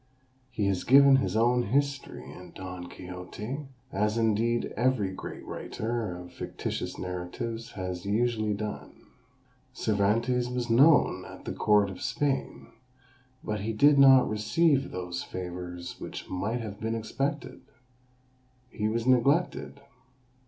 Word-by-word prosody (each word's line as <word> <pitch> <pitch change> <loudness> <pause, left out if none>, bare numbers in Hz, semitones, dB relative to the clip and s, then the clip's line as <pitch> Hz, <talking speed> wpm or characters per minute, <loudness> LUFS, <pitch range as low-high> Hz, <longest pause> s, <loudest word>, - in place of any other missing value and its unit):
He 115 -5 -2
has 95 -2 0
given 140 +1 +7
his 135 - -1
own 120 +2 +3
history 140 - -1
in 90 +3 -12
Don 90 -1 -7
Quixote, 100 - -7 0.2
as 105 +3 0
indeed 115 +1 +1
every 120 -5 +1
great 95 - -8
writer 110 -5 -4
of 90 0 -11
fictitious - - -4
narratives 105 +6 -5
has 90 -2 -5
usually 110 0 0
done. 105 +1 -5 0.8
Cervantes 115 +4 +1
was 125 -1 -2
known 145 +7 +5
at - - -11
the - - -3
court 105 -2 +3
of 90 - -10
Spain, 135 0 -2 0.7
but 105 -1 -2
he 110 +3 -2
did 140 +6 +5
not 135 -2 +8
receive 135 +7 +2
those 90 -1 -4
favours 90 -1 -6
which - - -7
might 110 +6 -2
have 105 -2 -7
been 110 +1 -2
expected; 130 +4 -3 1.1
he 105 -2 -1
was 115 +1 -1
neglected. 140 +4 +2
110 Hz, 125 wpm, -28 LUFS, 95-125 Hz, 1.1 s, not